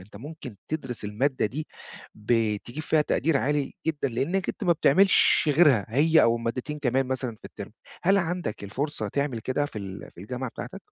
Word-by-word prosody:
أنت 100 Hz, +3 st, -14 dB
ممكن 135 Hz, -2 st, -9 dB
تدرس 130 Hz, -8 st, -4 dB
المادّة 120 Hz, +4 st, 0 dB
دي 150 Hz, +8 st, -5 dB, 0.5 s
ب 110 Hz, 0 st, +1 dB
تجيب 135 Hz, +6 st, -6 dB
فيها 155 Hz, -1 st, +3 dB
تقدير 155 Hz, +1 st, +1 dB
عالي 145 Hz, 0 st, 0 dB
جدًا، 150 Hz, -3 st, 0 dB
لإنّك 170 Hz, +10 st, -1 dB
أنت -, -, -3 dB
ما 175 Hz, -, +5 dB
بتعملش 190 Hz, +5 st, +4 dB
غيرها 140 Hz, -, +5 dB
هي 155 Hz, +7 st, +4 dB
أو 115 Hz, 0 st, +4 dB
مادتين 125 Hz, +6 st, -3 dB
كمان 135 Hz, -1 st, +1 dB
مثلًا 130 Hz, -1 st, -2 dB
في -, -, -30 dB
الترم -, -, -9 dB, 0.3 s
هل 195 Hz, +3 st, +4 dB
عندك 175 Hz, -, -3 dB
الفُرصة 140 Hz, +9 st, -3 dB
تعمل 140 Hz, -5 st, -2 dB
كده 130 Hz, +5 st, -1 dB
في 110 Hz, -, -7 dB
ال 95 Hz, -1 st, -8 dB
في -, -, -12 dB
الجامعة 125 Hz, +4 st, -4 dB
بتاعتك؟ -, -, -7 dB
135 Hz, 180 wpm, -26 LUFS, 115-155 Hz, 0.5 s, ما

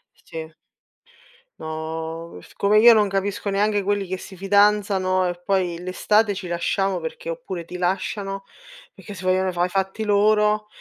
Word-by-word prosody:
Sì. 160 Hz, -1 st, -9 dB, 1.1 s
No, 160 Hz, -, -6 dB
siccome 205 Hz, +1 st, +1 dB
io 235 Hz, +2 st, +9 dB
non 210 Hz, -2 st, +3 dB
capisco 195 Hz, +1 st, -2 dB
neanche 205 Hz, +1 st, +1 dB
quelli 200 Hz, 0 st, -1 dB
che 185 Hz, +1 st, -4 dB
si 190 Hz, -, -11 dB
fidanzano 195 Hz, -1 st, +2 dB
e 175 Hz, 0 st, -5 dB
poi 180 Hz, -3 st, 0 dB
l'estate 205 Hz, +4 st, +1 dB
ci 190 Hz, -1 st, -6 dB
lasciamo 190 Hz, +3 st, 0 dB
perché -, -, -6 dB
oppure 190 Hz, -, -6 dB
ti 180 Hz, -, -7 dB
lasciano, 195 Hz, +2 st, -2 dB, 0.5 s
perché 205 Hz, -, -11 dB
si 185 Hz, -, -9 dB
vogliono 185 Hz, 0 st, +1 dB
fa 175 Hz, 0 st, 0 dB
i -, -, -4 dB
fatti 195 Hz, +3 st, -2 dB
loro 210 Hz, 0 st, +3 dB
195 Hz, 150 wpm, -23 LUFS, 180-205 Hz, 1.1 s, io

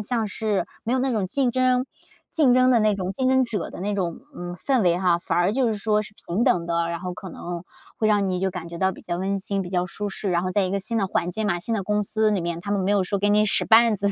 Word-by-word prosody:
像 220 Hz, 0 st, -1 dB
是， 210 Hz, -1 st, -1 dB, 0.2 s
没 235 Hz, -, -1 dB
有 260 Hz, -, +2 dB
那 265 Hz, 0 st, 0 dB
种 210 Hz, -5 st, 0 dB
竞 260 Hz, +5 st, 0 dB
争， 255 Hz, 0 st, +2 dB, 0.5 s
竞 285 Hz, -6 st, +4 dB
争 255 Hz, 0 st, +5 dB
的 240 Hz, -, +5 dB
那 215 Hz, -1 st, +3 dB
种 190 Hz, -1 st, -3 dB
竞 260 Hz, +5 st, 0 dB
争 260 Hz, 0 st, +4 dB
者 225 Hz, -6 st, -4 dB
的 -, -, -9 dB
那 205 Hz, +2 st, -1 dB
种， 180 Hz, -2 st, -2 dB, 0.2 s
嗯， 175 Hz, 0 st, -6 dB
氛 255 Hz, -, +1 dB
围 175 Hz, -1 st, +3 dB
哈， 180 Hz, -2 st, +2 dB
反 170 Hz, -, -2 dB
而 175 Hz, +4 st, +2 dB
就 260 Hz, 0 st, +1 dB
是 220 Hz, -, +1 dB
说 210 Hz, +1 st, +1 dB
是 210 Hz, -, -12 dB
平 195 Hz, +8 st, 0 dB
等 170 Hz, -1 st, +2 dB
的， 170 Hz, 0 st, 0 dB
然 170 Hz, -1 st, -4 dB
后 180 Hz, 0 st, -4 dB
可 195 Hz, -1 st, -8 dB
能， 175 Hz, +1 st, -6 dB, 0.3 s
会 220 Hz, -, 0 dB
让 205 Hz, -2 st, +2 dB
你 180 Hz, -1 st, -1 dB
就 190 Hz, -, 0 dB
感 175 Hz, -2 st, -7 dB
觉 170 Hz, -, -7 dB
到 190 Hz, 0 st, +2 dB
比 -, -, -12 dB
较 175 Hz, -1 st, -4 dB
温 195 Hz, +2 st, -1 dB
馨、 195 Hz, 0 st, -2 dB
比 175 Hz, -, -8 dB
较 180 Hz, -1 st, 0 dB
舒 205 Hz, +4 st, -4 dB
适， 195 Hz, 0 st, -3 dB
然 175 Hz, 0 st, +1 dB
后 185 Hz, -, -2 dB
在 205 Hz, -, +2 dB
一 185 Hz, -, -1 dB
个 200 Hz, -, 0 dB
新 225 Hz, +3 st, -2 dB
的 195 Hz, -, +1 dB
环 180 Hz, -1 st, -1 dB
境 215 Hz, +3 st, -2 dB
嘛、 175 Hz, -4 st, 0 dB
新 230 Hz, +4 st, -2 dB
的 200 Hz, -, -1 dB
公 210 Hz, +2 st, 0 dB
司 215 Hz, +1 st, +2 dB
里 200 Hz, -3 st, +1 dB
面， 170 Hz, 0 st, -3 dB
她 200 Hz, +3 st, -6 dB
们 200 Hz, -1 st, +1 dB
没 190 Hz, +2 st, 0 dB
有 200 Hz, -2 st, +3 dB
说 200 Hz, +2 st, -1 dB
给 205 Hz, -, +1 dB
你 210 Hz, +1 st, +4 dB
使 195 Hz, -, +1 dB
绊 225 Hz, -1 st, +5 dB
子， 200 Hz, +1 st, +1 dB
200 Hz, 325 characters per minute, -24 LUFS, 180-220 Hz, 0.5 s, 争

